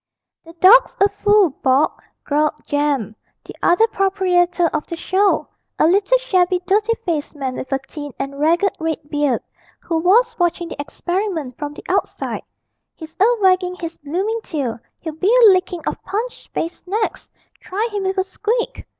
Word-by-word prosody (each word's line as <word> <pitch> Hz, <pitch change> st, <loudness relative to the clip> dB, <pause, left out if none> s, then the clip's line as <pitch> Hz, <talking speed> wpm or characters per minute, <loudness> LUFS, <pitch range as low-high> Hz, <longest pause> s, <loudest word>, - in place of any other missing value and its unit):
'The 330 Hz, -, -14 dB
dawg's 385 Hz, +9 st, +6 dB
a 395 Hz, -, +6 dB
fool, 410 Hz, -3 st, +3 dB
Bob,' 265 Hz, +3 st, +2 dB, 0.2 s
growled 300 Hz, +1 st, +1 dB
Jem, 285 Hz, -8 st, -1 dB, 0.3 s
the -, -, -10 dB
other 355 Hz, +6 st, +4 dB
proprietor 370 Hz, -4 st, +1 dB
of 305 Hz, -, -2 dB
the 335 Hz, -, -4 dB
show, 385 Hz, +4 st, +1 dB, 0.3 s
a -, -, +3 dB
little 395 Hz, +8 st, +4 dB
shabby 370 Hz, -7 st, +1 dB
dirty 420 Hz, +4 st, +2 dB
faced 315 Hz, -3 st, -2 dB
man 270 Hz, -3 st, -3 dB
with 260 Hz, -, -7 dB
a 270 Hz, -, +2 dB
thin 290 Hz, -2 st, -7 dB
and 275 Hz, +1 st, -5 dB
ragged 340 Hz, +6 st, +2 dB
red 320 Hz, -1 st, -1 dB
beard, 290 Hz, -5 st, 0 dB, 0.4 s
who 330 Hz, -1 st, -2 dB
was 465 Hz, +8 st, +3 dB
watching 345 Hz, -1 st, 0 dB
the 285 Hz, -, -5 dB
experiment 330 Hz, -, -3 dB
from 295 Hz, -1 st, -5 dB
the -, -, -11 dB
outside; -, -, -2 dB, 0.5 s
'he's 320 Hz, -1 st, -11 dB
a 395 Hz, -, +6 dB, 0.2 s
waggin' 370 Hz, -1 st, +3 dB
his 335 Hz, -2 st, -6 dB
bloomin' 385 Hz, +10 st, -2 dB
tail 270 Hz, -, -3 dB, 0.2 s
he'll 320 Hz, -2 st, -5 dB
be 370 Hz, +7 st, +1 dB
a -, -, +10 dB
lickin 365 Hz, -2 st, 0 dB
of -, -, -4 dB
Punch's 445 Hz, +6 st, -4 dB
face 335 Hz, +2 st, -5 dB
next! 425 Hz, +3 st, -2 dB, 0.3 s
Try 415 Hz, +5 st, -2 dB
him 410 Hz, -1 st, -2 dB
with 380 Hz, +1 st, -1 dB
a 380 Hz, -, +3 dB
squeak.' 435 Hz, +5 st, -3 dB
355 Hz, 165 wpm, -20 LUFS, 305-395 Hz, 0.5 s, a